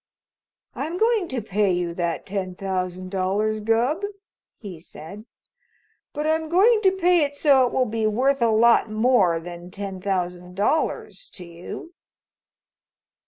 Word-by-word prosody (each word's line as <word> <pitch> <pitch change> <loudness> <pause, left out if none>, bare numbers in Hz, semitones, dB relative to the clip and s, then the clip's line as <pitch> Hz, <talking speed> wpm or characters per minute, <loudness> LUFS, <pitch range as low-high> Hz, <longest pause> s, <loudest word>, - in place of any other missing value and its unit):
"I'm 335 +3 -4
going 445 -3 +2
to 255 -6 -4
pay 205 -1 +1
you 175 -1 -1
that 170 -1 -3
ten 185 -2 -4
thousand 185 -1 -4
dollars, 200 +3 0
Gubb," 230 - +1 0.6
he 190 -7 -9
said, 175 +6 -11 0.9
"but 300 - -4
I'm 315 0 0
going 425 +6 +4
to 380 -3 +4
pay 360 -3 +3
it 285 0 -3
so 275 -4 +4
it - - -5
will 260 - +1
be 220 -1 -1
worth 260 +5 +1
a 235 - +4
lot 225 +1 +4
more 215 -6 +2
than 175 +1 -9
ten 195 -1 -7
thousand 180 -2 -3
dollars 310 - -1
to 180 - -9
you." 170 - -9
215 Hz, 145 wpm, -23 LUFS, 185-285 Hz, 0.9 s, going